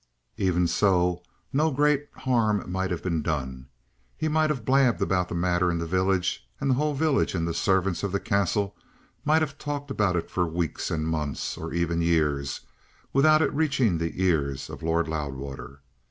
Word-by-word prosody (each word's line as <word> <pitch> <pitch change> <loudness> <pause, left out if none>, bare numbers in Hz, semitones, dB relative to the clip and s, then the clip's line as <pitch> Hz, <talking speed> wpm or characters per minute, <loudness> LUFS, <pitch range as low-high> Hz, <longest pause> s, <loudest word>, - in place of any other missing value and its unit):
Even 90 -2 +2
so, 90 -1 +2 0.3
no 155 +4 +3
great 145 0 +1
harm 115 -6 +1
might 95 0 -1
have 90 -3 -3
been 85 -4 0
done. 65 -5 -3 0.5
He 155 - -1
might 155 0 +2
have 130 -7 -2
blabbed 130 -2 +3
about 90 -1 0
the - - -4
matter 90 +1 +1
in 85 - 0
the 85 - -2
village, 95 +1 0
and 135 -1 +1
the - - +5
whole 150 +3 0
village 145 -7 +1
and 85 -1 -1
the 85 - -1
servants 95 -2 +1
of 100 - -2
the 100 - 0
Castle 100 0 0 0.5
might 155 +2 +3
have 145 -1 -5
talked 145 -1 -4
about 105 -8 +1
it 85 - -3
for 90 -1 +1
weeks 80 -1 -2
and 80 0 -1
months, 75 -4 -2
or 80 - -6
even 85 0 0
years, 75 -5 +1 0.5
without 155 +3 +5
it - - 0
reaching 135 - +1
the 85 +2 -3
ears 70 -7 0
of - - -9
Lord 80 +1 +1
Loudwater. 70 -2 -5
90 Hz, 185 wpm, -26 LUFS, 80-130 Hz, 0.5 s, the